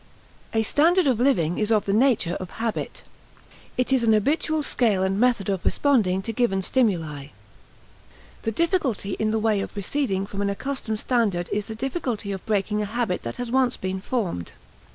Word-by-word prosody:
A 225 0 +2
standard 340 - +3
of 255 -5 +2
living 180 - +2
is 215 0 0
of 215 -2 +3
the 195 - 0
nature 220 -7 +3
of 185 - -6
habit. 225 -1 -3 0.7
It 255 +1 +1
is 260 -3 +3
an 225 -1 +4
habitual 300 +7 +1
scale 220 -8 +1
and 190 +1 0
method 240 -5 +2
of 195 -3 -1
responding 205 -10 +2
to 225 - -4
given 205 -5 +1
stimuli. 165 - 0 1.1
The 225 - -1
difficulty 270 - 0
in 215 - +1
the 220 - +1
way 215 -2 +1
of - - -6
receding 200 -1 -1
from 200 0 -5
an 200 - +1
accustomed 220 0 -3
standard 210 -10 0
is 205 -1 -1
the 220 - -6
difficulty 240 -5 -3
of 190 -2 -5
breaking 210 0 0
a - - -1
habit 220 -3 -1
that 115 - -5
has 245 -1 -5
once 255 -1 +2
been 185 0 -3
formed. 190 - -3
220 Hz, 180 wpm, -24 LUFS, 195-250 Hz, 1.1 s, an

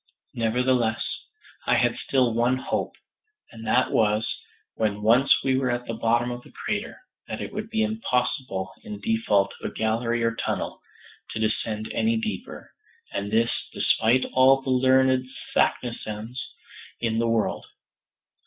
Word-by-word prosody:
Nevertheless, 115 0 +1 0.6
I - - +4
had - - +2
still 125 -4 +1
one 120 +3 +2
hope, - - -2 0.6
and 115 -1 -9
that 125 +4 +3
was, 105 0 +2 0.5
when 105 -2 -1
once 120 +5 +4
we 130 -1 +2
were 130 -1 0
at 120 0 -1
the 115 - -4
bottom 120 +2 +1
of 120 0 -5
the - - -17
crater, - - -4 0.3
that - - -5
it - - -6
would 215 +1 -4
be 220 -1 +1
impossible 125 - -1
in 215 -3 -7
default 225 - +1
of - - -3
a - - -15
gallery 115 +2 0
or 115 0 +2
tunnel, - - -3 0.5
to - - -4
descend 110 0 -1
any 225 +1 +2
deeper; 225 -1 -5 0.4
and 100 - -2
this, 115 +1 +3 0.2
despite 120 +4 +3
all 135 +1 +5
the 130 - -1
learned 130 0 +4 0.3
Saknussemms 115 0 -1 0.6
in 115 -1 0
the 115 - +1
world. 115 -2 0
120 Hz, 145 wpm, -25 LUFS, 110-130 Hz, 0.6 s, all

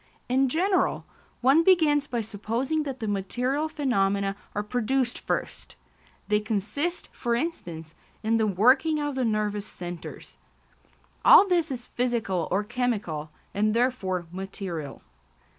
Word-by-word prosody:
In 260 +1 +2
general, 365 +6 +1 0.4
one 275 +6 +5
begins 310 -6 +4
by 240 -4 -1
supposing 230 +8 -2
that 275 -4 -5
the 220 - -2
material 250 +10 -1
phenomena 200 -10 0 0.2
are 205 - -1
produced 245 +3 0
first; - - -4 0.5
they 210 0 +3
consist, 220 - -2
for 235 -1 -1
instance, 170 - -4 0.3
in 225 +1 +2
the 220 -1 +2
working 255 - +3
of 290 -1 -2
the 265 -1 -1
nervous 210 -2 -1
centres. 175 -1 -8 0.9
All 400 - +9
this 345 -4 +2
is 250 -3 -5
physical 230 -8 -1
or 195 +3 +1
chemical, 205 -10 -2 0.2
and 215 +2 +1
therefore 200 -8 0
material. 180 -6 -6
235 Hz, 125 wpm, -26 LUFS, 200-270 Hz, 0.9 s, All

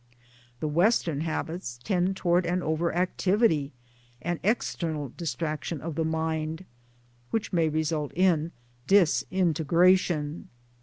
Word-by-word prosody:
The 155 - 0
Western 165 -2 +2
habits 160 -5 -4
tend 190 -1 0
towards 175 -1 +2
an 180 +1 0
over 160 +2 0
activity 180 -3 +1 0.5
and 170 +5 -3
external 160 - -1
distraction 160 -2 -3
of 160 +3 -5
the 160 - -1
mind, 160 +1 -2 0.6
which 225 -2 -2
may 165 -2 +3
result 155 -1 -1
in 170 -3 +2 0.4
disintegration. 175 -3 +2
165 Hz, 105 wpm, -27 LUFS, 155-180 Hz, 0.6 s, may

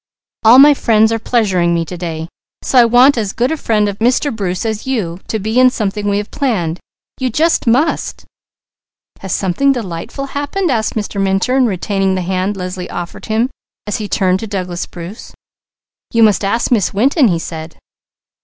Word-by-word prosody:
All 225 +3 +7
my 290 +2 +8
friends 220 -4 +3
are 225 - 0
pleasuring 190 -8 +1
me 165 0 -1
to 180 - -7
day. 165 -2 -5 0.4
So 260 - +3
I 240 - +7
want 245 +3 +5
as 210 -3 -3
good 245 +4 0
a - - 0
friend 215 -8 0
of 200 -1 -5
Mr. 250 +3 +1
Bruce 185 -2 -3
as 220 +3 -3
you, 190 -10 -2
to 220 - -2
be 220 +4 0
in 255 0 +7
something 210 -3 -2
we 200 - +1
have 205 0 -4
planned. 185 - -1 0.4
You 260 -1 0
just 315 +3 +1
must!" 265 +8 0 0.9
"Has 190 - -7
something 200 +9 +1
delightful 230 +2 -4
happened?" 290 +5 -1
asked 220 -3 -1
Mr. 205 -2 -3
Minturn, 215 +7 +2
retaining 195 -1 -1
the 185 - -2
hand 190 +2 -2
Leslie 180 0 -5
offered 175 0 -7
him 225 +4 0 0.3
as 210 - -2
he 215 - -5
turned 185 -1 +1
to 225 - -6
Douglas 185 -4 -4
Bruce. 180 +5 -10 0.8
"You 230 -1 +3
must 210 -2 +3
ask 230 +6 0
Miss 210 -5 +1
Winton," 265 - +3
he 175 -5 +1
said. 160 -1 -7
210 Hz, 180 wpm, -15 LUFS, 185-245 Hz, 0.9 s, my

